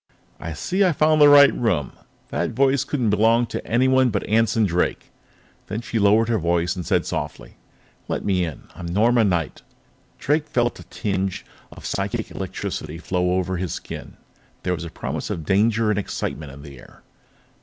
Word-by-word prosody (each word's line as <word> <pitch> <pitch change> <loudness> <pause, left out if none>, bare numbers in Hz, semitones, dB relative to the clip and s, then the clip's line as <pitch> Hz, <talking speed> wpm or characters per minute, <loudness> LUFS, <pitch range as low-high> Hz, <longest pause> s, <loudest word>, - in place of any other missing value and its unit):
"I 85 - -5
see 185 - 0
I've 180 -5 +2
found 155 0 +4
the 145 - +9
right 140 -1 +8
room," 90 - 0
she - - -26
said. - - -27 0.2
"That - - -2
voice 135 +1 +3
couldn't 125 -6 -1
belong 115 +3 +3
to - - -5
anyone 130 +2 +3
but 100 -3 -2
Anson 115 0 +2
Drake." 90 -2 -1 0.6
Then 105 +3 -4
she 115 -1 -2
lowered 105 +2 +4
her 115 -2 +1
voice 85 +1 0
and 90 - -4
said - - +1
softly: 65 -5 -5 0.5
"Let - - -3
me 95 -3 +1
in. 80 -4 -5
I'm 85 -1 -7
Norma 115 +6 +3
Knight." 85 -8 -1 0.6
Drake 150 +2 0
felt 120 -1 0
a - - -10
tingle 95 -3 -3 0.3
of - - -12
psychic - - -3
electricity 75 +1 -5
flow 90 +1 -1
over 95 0 -1
his 90 -2 -3
skin; - - -8 0.5
there 90 - 0
was 85 -1 -5
a - - -6
promise - - -5
of 80 - -4
danger 110 +4 +2
and 105 - 0
excitement 80 -6 -4
in 70 +1 -12
the 70 -3 -11
air. - - -17
105 Hz, 185 wpm, -22 LUFS, 85-120 Hz, 0.6 s, the